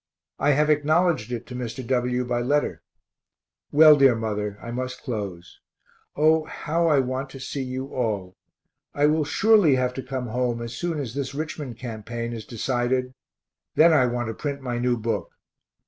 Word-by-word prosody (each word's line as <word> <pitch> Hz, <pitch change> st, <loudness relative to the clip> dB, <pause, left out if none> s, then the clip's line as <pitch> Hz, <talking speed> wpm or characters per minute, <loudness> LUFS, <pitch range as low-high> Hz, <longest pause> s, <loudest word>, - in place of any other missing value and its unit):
I 145 Hz, 0 st, +3 dB
have 150 Hz, +2 st, +3 dB
acknowledged 155 Hz, -4 st, +2 dB
it 120 Hz, -1 st, -4 dB
to 125 Hz, -, -9 dB
Mr. 125 Hz, +1 st, -5 dB
W. 125 Hz, 0 st, 0 dB
by 120 Hz, 0 st, -1 dB
letter. 145 Hz, +4 st, 0 dB, 0.9 s
Well, 155 Hz, +1 st, +8 dB
dear 135 Hz, -4 st, +5 dB
mother, 105 Hz, -2 st, -3 dB
I 115 Hz, -, -7 dB
must 125 Hz, +1 st, -5 dB
close. 95 Hz, -7 st, -6 dB, 0.6 s
O, 155 Hz, +1 st, +3 dB
how 165 Hz, +2 st, -1 dB
I 150 Hz, -3 st, +4 dB
want 130 Hz, +1 st, -1 dB
to 135 Hz, -, -10 dB
see 135 Hz, +1 st, -4 dB
you 130 Hz, 0 st, -4 dB
all 105 Hz, -7 st, -2 dB, 0.6 s
I 145 Hz, -, +3 dB
will 155 Hz, 0 st, +2 dB
surely 205 Hz, -4 st, +4 dB
have 125 Hz, -1 st, 0 dB
to 130 Hz, -, -5 dB
come 130 Hz, -1 st, -4 dB
home 120 Hz, 0 st, -1 dB
as 115 Hz, 0 st, -6 dB
soon 170 Hz, 0 st, -2 dB
as 125 Hz, -5 st, -4 dB
this 135 Hz, 0 st, -4 dB
Richmond 145 Hz, -5 st, -5 dB
campaign 115 Hz, 0 st, -5 dB
is 110 Hz, -3 st, -7 dB
decided 125 Hz, +2 st, -1 dB, 0.6 s
then 165 Hz, +1 st, +6 dB
I 130 Hz, -5 st, +4 dB
want 120 Hz, -1 st, -2 dB
to -, -, -3 dB
print 140 Hz, +3 st, -4 dB
my 125 Hz, -3 st, -3 dB
new 125 Hz, 0 st, +1 dB
book. 115 Hz, +1 st, -3 dB
130 Hz, 175 wpm, -24 LUFS, 120-145 Hz, 0.9 s, Well